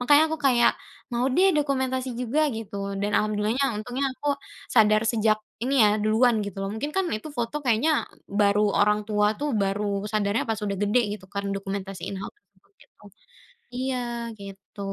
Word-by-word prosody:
Makanya 290 +4 +6
aku 320 - -1
kayak, 240 -2 +5 0.4
mau 240 +2 +1
deh 380 +6 +5
dokumentasi 260 -3 0
juga 250 +5 0 0.2
gitu 220 -2 -7 0.3
dan 205 +1 0
Alhamdulillah-nya, 215 +5 +1
untungnya 245 +6 -3
aku 285 +2 -1 0.4
sadar 215 -1 +5
sejak 215 -1 +2 0.3
ini 270 +3 0
ya, 210 0 +4
duluan 225 +3 +4
gitu 200 -1 -7
loh. 195 - -2
Mungkin 290 +7 -4
kan 385 - +2
itu 310 - -8
foto 240 +1 -3
kayaknya 245 +5 +3 0.5
baru 205 +1 +4 0.2
orang 210 +1 +3
tua 210 -1 +2
tuh, 295 - -2
baru 200 +2 -1 0.3
sadarnya 210 +1 +1
pas 220 - 0
sudah 200 -1 -2
gede 205 +4 +3 0.2
gitu 190 - -17
kan 200 - -2
dokumentasiin 195 -1 -5
hal-hal 420 - -9 0.2
kayak 400 - -36
gitu. - - -27 0.7
Iya 260 +1 -1 0.4
gitu. 195 0 -12
220 Hz, 165 wpm, -25 LUFS, 205-260 Hz, 0.7 s, Makanya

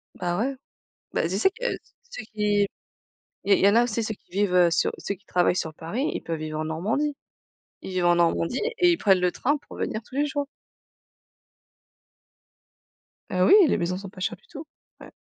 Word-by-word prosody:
Bah 175 0 -2
ouais. 270 +4 -1 0.6
Bah, - - +1
tu 185 +3 -2
sais 230 - +4
que 445 +5 -12 0.5
ceux 485 - -6
qui 210 -1 +2
i - - 0 0.8
il 200 - +5
y 195 - +5
en 200 - +4
a 235 - +5
aussi, 230 -1 -1
ceux 215 0 -3
qui - - -33
vivent, 200 -1 0
heu, 175 -1 +5
sur 165 - +2
ceux 200 - -4
qui 200 +1 -24
travaillent 180 0 +2
sur 160 -4 -3
Paris, 215 - -3
ils - - -4
peuvent 165 -1 -4
vivre 155 0 -4
en - - -2
Normandie. 215 - -1 0.7
Ils - - -7
vivent 180 -1 0
en 175 0 +5
Normandie 170 +5 +1 0.2
et 355 -1 +5
ils 340 - +1
prennent 190 - +3
le 180 0 +2
train 290 +10 0
pour 285 - -13
venir 215 - -3
tous 255 - -14
les 290 +1 +2
jours. 285 0 -2 2.9
Heu, 185 0 +2
oui, - - +6
les - - +2
maisons 180 0 -1
sont 195 0 -8
pas 185 - -14
chères 185 - -2
du 480 - -29
tout. 325 -8 -9 0.3
Ouais. - - -12
200 Hz, 210 wpm, -25 LUFS, 175-255 Hz, 2.9 s, oui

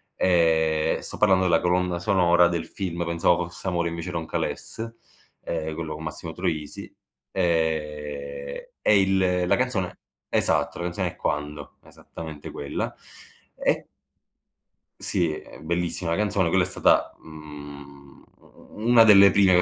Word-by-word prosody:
Ehm, 80 -3 +2
e - - -9
sto - - -6
parlando 95 -3 +4
della 85 -2 +4
colonna 90 0 +1
sonora 85 -1 +4
del 85 -1 -3
film 85 -3 -4
"Pensavo 85 +1 +1
fosse 90 +2 -8
amore 85 -2 0
invece 85 +1 -5
era 85 -1 -2
un 80 - -7
calesse", 115 +1 -4 0.5
ehm, 80 -1 -3
quello 80 -1 -5
con 80 - -8
Massimo 80 +1 -6
Troisi. 80 -4 -4 0.4
Ehm, 75 -5 -2 0.2
e 105 -2 +4
il 95 -2 +2
la - - +4
canzone 125 -8 -1 0.3
esatto, - - +1
la 85 - -4
canzone 90 +1 -2
è - - -21
"Quando", 75 0 -4
esattamente 80 -3 -10
quella. 70 - -4 0.6
E - - 0 1.1
Sì, 85 -4 +1
è - - -10
bellissima 85 +1 -1
canzone, 105 -4 +1
quella 90 +2 +3
è - - 0
stata, - - +2
mhmm, 70 -3 -12 0.2
u - - -24 0.4
u 115 - -2
una 115 -2 +8
delle 100 -2 +8
prime 95 -3 +5
85 Hz, 145 wpm, -25 LUFS, 80-90 Hz, 1.1 s, una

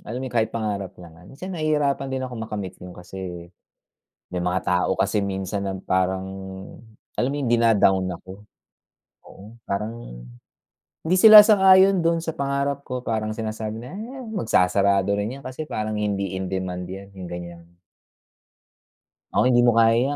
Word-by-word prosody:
alam 120 +4 -6
mo - - -4
yun, 130 - -7
kahit 110 -2 +1
pangarap 105 -4 -4
naman. 85 0 -14
Kasi 185 +5 -7
nahihirapan 150 -4 0
din 130 0 -3
akong 125 -3 -7
makamit 105 -4 -5
yon 90 0 -10
kasi, 90 -1 -8 0.8
may 90 - -2
mga 90 +1 0
tao 90 -1 +1
kasi 100 +2 +1
minsan 95 0 -3
na 95 - -4
parang, 95 0 -1 0.9
alam 125 - -1
mo 140 - -3
yung 140 - -2
dina-down 105 -5 +3
ako? 95 +3 -12 0.8
Oo, 105 +4 -14
parang 100 - -6 0.8
hindi 180 - +3
sila 215 +3 +10
sang-ayon 190 -3 +6
doon 165 0 +2
sa 165 -1 -5
pangarap 140 -1 -2
ko, 125 0 -4
parang 110 -3 -2
sinasabi 110 0 -5
na, 125 +9 -9
"Eh, 235 +6 -7
magsasarado 100 - +2
rin 110 +7 -3
'yan - - -17
kasi 130 +4 -6
parang 110 -7 -4
hindi 100 -3 -2
in 95 -1 -4
demand 90 -1 -3
yan." 95 +2 -9
yung 95 - -8
ganyan. 85 0 -10 1.6
Oo, - - +4
"Hindi 125 -1 +4
mo 120 -1 +3
kaya 115 +4 +4
110 Hz, 160 wpm, -23 LUFS, 95-135 Hz, 1.6 s, sila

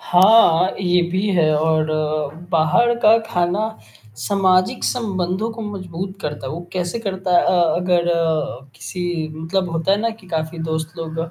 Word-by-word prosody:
हाँ, 185 -2 +5
ये 180 -1 +2
भी 190 +3 0
है 160 -3 +3
और 155 0 +1 0.6
बाहर 175 +9 +3
का 215 0 +6
खाना 180 +5 0 0.5
सामाजिक 185 - +1
संबंधों 195 -2 -1
को 225 0 -7
मजबूत 190 -2 -6
करता 150 -5 -5
है। 130 - -4
वो 165 - -5
कैसे 180 +3 -2
करता 190 -4 -1
है - - +5
अ, - - +2 0.3
अगर 175 -1 +1 0.7
किसी 175 +3 -4
मतलब 170 +3 -2
होता 165 +3 0
है 200 - +2
ना 230 +1 0
कि 220 -3 -13
काफ़ी 160 0 -3
दोस्त 160 0 -3
लोग 165 -1 -6
अ, 165 0 -3
180 Hz, 160 wpm, -20 LUFS, 165-195 Hz, 0.7 s, का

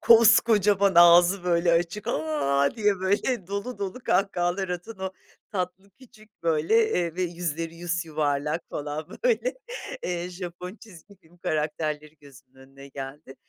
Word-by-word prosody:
koskocaman 215 -4 +5
ağzı, 175 +2 +7
böyle, 170 -1 +2
açık, 175 +5 0
"A!" 140 -2 +1
diye, 205 -3 +1
böyle, 200 +2 0
dolu 200 +3 -4
dolu 200 +4 -4
kahkahalar 190 -1 0
atan 180 +4 -6
o 190 0 -4 0.4
tatlı, 190 +1 -4
küçük, 215 -3 -20
böyle, 165 +8 +2
eee, 170 -2 -1
ve 185 - 0
yüzleri 165 -2 -3
yusyuvarlak 160 -3 -1
falan, 150 +1 -4 0.2
böyle, - - +2 0.5
eee, 175 0 -3
Japon 180 +2 -7
çizgi 200 -1 -16
film 175 -1 -24
karakterleri 155 -2 -3
gözümün 135 -2 -18
önüne 135 +1 -14
geldi. 135 +1 -9
175 Hz, 130 wpm, -26 LUFS, 155-200 Hz, 0.5 s, ağzı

